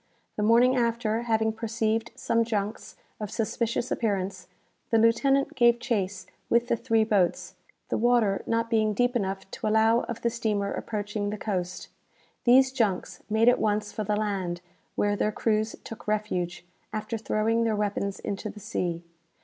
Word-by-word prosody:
The -, -, -2 dB
morning 235 Hz, +4 st, +5 dB
after, 230 Hz, -2 st, 0 dB
having 220 Hz, -2 st, +1 dB
perceived 225 Hz, 0 st, -1 dB
some 230 Hz, 0 st, +1 dB
junks 215 Hz, -1 st, -3 dB, 0.2 s
of 210 Hz, -2 st, -4 dB
suspicious 235 Hz, +3 st, -1 dB
appearance, 195 Hz, -4 st, -1 dB, 0.4 s
the 230 Hz, -, +3 dB
lieutenant 270 Hz, +5 st, +3 dB
gave 240 Hz, -1 st, +4 dB
chase 205 Hz, -6 st, -2 dB, 0.2 s
with 235 Hz, +1 st, +2 dB
the -, -, +3 dB
three 225 Hz, -1 st, +2 dB
boats, 200 Hz, -5 st, +1 dB, 0.4 s
the -, -, 0 dB
water 230 Hz, -4 st, +3 dB
not 230 Hz, 0 st, +1 dB
being 215 Hz, -2 st, +1 dB
deep 245 Hz, +3 st, +1 dB
enough 195 Hz, -3 st, -2 dB
to -, -, -4 dB
allow 220 Hz, +2 st, +4 dB
of 235 Hz, -1 st, -6 dB
the 235 Hz, -, +2 dB
steamer 215 Hz, -4 st, -1 dB
approaching 205 Hz, -1 st, -3 dB
the 210 Hz, -, -4 dB
coast. 185 Hz, -4 st, -3 dB, 0.6 s
These 260 Hz, +2 st, +6 dB
junks 215 Hz, -8 st, -1 dB
made 220 Hz, +2 st, +3 dB
at 245 Hz, -, +5 dB
once 210 Hz, 0 st, 0 dB
for 215 Hz, -, -3 dB
the 210 Hz, +1 st, 0 dB
land, 195 Hz, -5 st, -2 dB, 0.3 s
where 205 Hz, 0 st, +1 dB
their 210 Hz, -, 0 dB
crews 215 Hz, 0 st, 0 dB
took 225 Hz, -, -10 dB
refuge, 185 Hz, -5 st, -2 dB, 0.3 s
after 215 Hz, +2 st, -3 dB
throwing 225 Hz, +1 st, +1 dB
their 225 Hz, -1 st, +1 dB
weapons 200 Hz, -1 st, -1 dB
into 200 Hz, +2 st, -4 dB
the 210 Hz, -, -10 dB
sea. 175 Hz, -3 st, -3 dB
220 Hz, 160 wpm, -27 LUFS, 205-230 Hz, 0.6 s, These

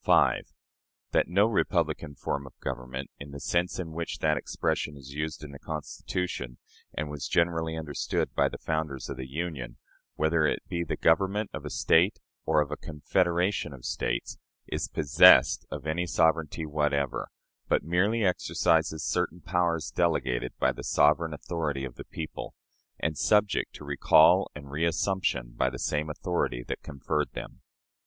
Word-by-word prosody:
5. -, -, +4 dB, 0.7 s
That -, -, +3 dB
no 95 Hz, +4 st, +4 dB
"republican 80 Hz, -8 st, 0 dB
form 70 Hz, 0 st, -3 dB
of 65 Hz, -, -16 dB
government," 65 Hz, +2 st, -5 dB
in 70 Hz, -, -8 dB
the 70 Hz, 0 st, -8 dB
sense 85 Hz, +6 st, 0 dB
in 85 Hz, -3 st, -4 dB
which 85 Hz, +1 st, -4 dB
that 75 Hz, -1 st, +2 dB
expression 75 Hz, 0 st, -2 dB
is 70 Hz, 0 st, -11 dB
used 75 Hz, +1 st, -4 dB
in 75 Hz, -, -8 dB
the 70 Hz, -, -10 dB
Constitution, 80 Hz, -3 st, -4 dB, 0.4 s
and 75 Hz, -, -2 dB
was 75 Hz, -3 st, -5 dB
generally 80 Hz, -1 st, +1 dB
understood 75 Hz, -3 st, -2 dB
by -, -, +3 dB
the -, -, -7 dB
founders 80 Hz, -4 st, -3 dB
of 70 Hz, -, -5 dB
the 65 Hz, 0 st, -6 dB
Union 70 Hz, -5 st, -4 dB, 0.4 s
whether 80 Hz, +1 st, +2 dB
it -, -, -2 dB
be 85 Hz, -1 st, -2 dB
the 85 Hz, -, -3 dB
government 95 Hz, +5 st, +2 dB
of -, -, -6 dB
a -, -, -4 dB
State 90 Hz, +6 st, +3 dB, 0.3 s
or 80 Hz, -1 st, +4 dB
of 75 Hz, -1 st, -2 dB
a 75 Hz, -, -3 dB
confederation 85 Hz, +3 st, 0 dB
of 65 Hz, -3 st, -11 dB
States -, -, -2 dB, 0.3 s
is -, -, -3 dB
possessed 75 Hz, -4 st, +6 dB
of -, -, -6 dB
any 85 Hz, +3 st, -1 dB
sovereignty 80 Hz, -1 st, +1 dB
whatever, 75 Hz, -3 st, 0 dB, 0.4 s
but -, -, +2 dB
merely 100 Hz, +7 st, +2 dB
exercises 80 Hz, -3 st, +1 dB
certain 90 Hz, -, -1 dB
powers 85 Hz, -2 st, 0 dB
delegated 65 Hz, -8 st, 0 dB
by -, -, +3 dB
the -, -, -8 dB
sovereign 75 Hz, +3 st, +3 dB
authority 75 Hz, -3 st, -3 dB
of 65 Hz, -, -7 dB
the -, -, -10 dB
people, 80 Hz, -1 st, -7 dB, 0.4 s
and 75 Hz, 0 st, -1 dB
subject 105 Hz, -1 st, +2 dB
to 75 Hz, -, -10 dB
recall 70 Hz, -1 st, +5 dB
and 75 Hz, -1 st, -8 dB
reassumption 80 Hz, -5 st, 0 dB
by 65 Hz, -, +2 dB
the 65 Hz, -, -7 dB
same 75 Hz, +4 st, -1 dB
authority 75 Hz, -6 st, -1 dB
that -, -, -5 dB
conferred 75 Hz, +2 st, -2 dB
them. -, -, -8 dB
80 Hz, 160 wpm, -28 LUFS, 70-85 Hz, 0.7 s, possessed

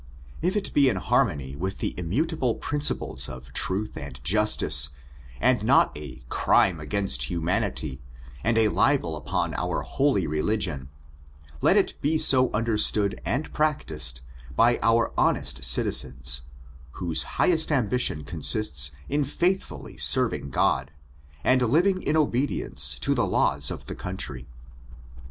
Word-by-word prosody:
If 180 Hz, +5 st, 0 dB
it 205 Hz, -, -2 dB
be 140 Hz, -2 st, +5 dB
in 115 Hz, -, -1 dB
harmony 85 Hz, -, 0 dB
with 95 Hz, +6 st, -4 dB
the -, -, -2 dB
immutable 125 Hz, -, -1 dB
principles 145 Hz, -, -1 dB
of 65 Hz, +1 st, -10 dB
truth 100 Hz, +3 st, -3 dB
and 65 Hz, -2 st, -8 dB
justice, 95 Hz, -5 st, +2 dB, 0.5 s
and -, -, +3 dB
not -, -, +4 dB
a 65 Hz, -4 st, -9 dB
" -, -, -21 dB
crime 90 Hz, -4 st, +3 dB
against 75 Hz, -6 st, -1 dB
humanity," 85 Hz, -, -2 dB, 0.4 s
and 115 Hz, +1 st, +1 dB
a 110 Hz, -1 st, +4 dB
libel 130 Hz, -, +1 dB
upon 75 Hz, -, -2 dB
our -, -, -2 dB
holy 135 Hz, -, +1 dB
religion, 75 Hz, -3 st, -2 dB, 0.7 s
let -, -, +4 dB
it -, -, 0 dB
be 155 Hz, +3 st, +1 dB
so 130 Hz, -4 st, +4 dB
understood 105 Hz, -2 st, 0 dB
and 125 Hz, -, -2 dB
practised 80 Hz, -, 0 dB, 0.3 s
by 120 Hz, +1 st, +4 dB
our 115 Hz, +1 st, +2 dB
honest 65 Hz, -1 st, 0 dB
citizens, 65 Hz, +1 st, +1 dB, 0.5 s
whose 85 Hz, -3 st, -1 dB, 0.2 s
highest 160 Hz, -3 st, +2 dB
ambition 125 Hz, -, +1 dB
consists 75 Hz, -, -1 dB, 0.2 s
in 145 Hz, +1 st, 0 dB
faithfully 170 Hz, -, -2 dB
serving 70 Hz, -, +2 dB
God, 65 Hz, 0 st, +1 dB, 0.5 s
and 130 Hz, 0 st, +3 dB
living 175 Hz, -, +2 dB
in 155 Hz, -, 0 dB
obedience 125 Hz, -, 0 dB
to -, -, +2 dB
the -, -, 0 dB
laws -, -, +1 dB
of -, -, -7 dB
the -, -, -6 dB
country. 70 Hz, -9 st, -6 dB
100 Hz, 135 wpm, -25 LUFS, -, 0.7 s, be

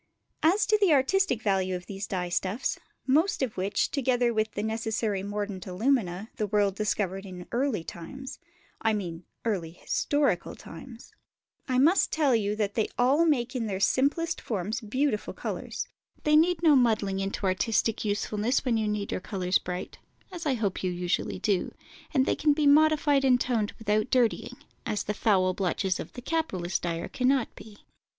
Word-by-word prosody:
As 380 Hz, +7 st, +4 dB
to 430 Hz, 0 st, +3 dB
the 375 Hz, -6 st, +5 dB
artistic 280 Hz, -, +2 dB
value 190 Hz, -2 st, +1 dB
of 180 Hz, 0 st, -6 dB
these 195 Hz, +1 st, -6 dB
dye 180 Hz, -2 st, -2 dB
stuffs, 190 Hz, +6 st, -1 dB, 0.3 s
most 305 Hz, +4 st, +2 dB
of 245 Hz, -5 st, -2 dB
which, 190 Hz, +2 st, 0 dB
together 245 Hz, -3 st, +1 dB
with 220 Hz, 0 st, 0 dB
the 205 Hz, -, -3 dB
necessary 220 Hz, -2 st, -1 dB
mordant 205 Hz, -2 st, -4 dB
alumina, 205 Hz, -1 st, 0 dB
the 215 Hz, -, -1 dB
world 205 Hz, -1 st, +2 dB
discovered 195 Hz, -2 st, -1 dB
in 180 Hz, -2 st, -9 dB
early 240 Hz, -7 st, 0 dB
times 260 Hz, +12 st, -8 dB, 0.4 s
(I 220 Hz, 0 st, +2 dB
mean 175 Hz, -5 st, -4 dB, 0.2 s
early 190 Hz, -8 st, -1 dB
historical 275 Hz, 0 st, 0 dB
times), 230 Hz, +8 st, -11 dB, 0.6 s
I 255 Hz, -2 st, +1 dB
must 320 Hz, +9 st, +4 dB
tell 290 Hz, -6 st, +3 dB
you 210 Hz, -2 st, 0 dB
that 205 Hz, -2 st, -1 dB
they 220 Hz, -2 st, +1 dB
all 280 Hz, +7 st, +4 dB
make 255 Hz, -4 st, +1 dB
in 230 Hz, -3 st, -1 dB
their 190 Hz, -2 st, -3 dB
simplest 295 Hz, +10 st, +1 dB
forms 215 Hz, +2 st, -3 dB
beautiful 230 Hz, +1 st, -1 dB
colours; -, -, -4 dB, 0.4 s
they 300 Hz, 0 st, +4 dB
need 335 Hz, +2 st, +3 dB
no 310 Hz, -3 st, +6 dB
muddling 215 Hz, -6 st, +2 dB
into 195 Hz, +1 st, -3 dB
artistic 210 Hz, +4 st, +1 dB
usefulness, 210 Hz, +4 st, 0 dB
when 240 Hz, -3 st, +2 dB
you 215 Hz, -1 st, 0 dB
need 210 Hz, -1 st, -2 dB
your -, -, -2 dB
colours 185 Hz, -2 st, 0 dB
bright 180 Hz, 0 st, -6 dB, 0.3 s
(as 340 Hz, -3 st, -5 dB
I 270 Hz, -, +2 dB
hope 210 Hz, -5 st, -2 dB
you 185 Hz, -, 0 dB
usually 180 Hz, 0 st, -1 dB
do), 195 Hz, -1 st, -1 dB, 0.4 s
and 265 Hz, -4 st, +3 dB
they -, -, +1 dB
can 300 Hz, -1 st, +3 dB
be 300 Hz, 0 st, 0 dB
modified 290 Hz, -1 st, +5 dB
and 255 Hz, -2 st, +4 dB
toned 230 Hz, -5 st, 0 dB
without 215 Hz, +1 st, 0 dB
dirtying, 245 Hz, -4 st, +1 dB, 0.3 s
as 210 Hz, -, -2 dB
the 210 Hz, -, -2 dB
foul 190 Hz, -4 st, +2 dB
blotches 190 Hz, 0 st, -1 dB
of -, -, -7 dB
the 245 Hz, -, -9 dB
capitalist 190 Hz, -, -1 dB
dyer 170 Hz, -1 st, -3 dB
cannot 260 Hz, -1 st, +1 dB
be. 210 Hz, -2 st, -13 dB
220 Hz, 170 wpm, -28 LUFS, 195-265 Hz, 0.6 s, no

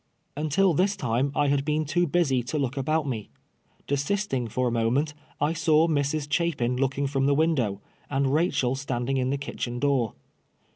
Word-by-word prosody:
Until 155 Hz, +5 st, +2 dB
this 195 Hz, +6 st, +2 dB
time 130 Hz, 0 st, 0 dB
I 145 Hz, -, +2 dB
had 140 Hz, -1 st, +2 dB
been 155 Hz, +1 st, 0 dB
too 175 Hz, +4 st, +1 dB
busy 145 Hz, -6 st, +2 dB
to 140 Hz, +5 st, -2 dB
look 135 Hz, -2 st, -1 dB
about 150 Hz, +2 st, 0 dB
me. 110 Hz, -6 st, -4 dB, 0.6 s
Desisting 140 Hz, -, -1 dB
for 125 Hz, +3 st, -1 dB
a -, -, 0 dB
moment, 120 Hz, +6 st, +1 dB, 0.3 s
I 150 Hz, +2 st, +1 dB
saw 160 Hz, 0 st, +3 dB
Mrs. 145 Hz, -1 st, 0 dB
Cliapin 145 Hz, -6 st, 0 dB
looking 135 Hz, +1 st, 0 dB
from 135 Hz, 0 st, 0 dB
the 140 Hz, -, +3 dB
window, 135 Hz, -11 st, +1 dB, 0.3 s
and 135 Hz, -1 st, +1 dB
Rachel 145 Hz, -6 st, +1 dB
standing 135 Hz, -1 st, -2 dB
in 130 Hz, 0 st, 0 dB
the 140 Hz, -, 0 dB
kitchen 120 Hz, -3 st, -4 dB
door. 130 Hz, -4 st, +1 dB
140 Hz, 175 wpm, -26 LUFS, 130-155 Hz, 0.6 s, saw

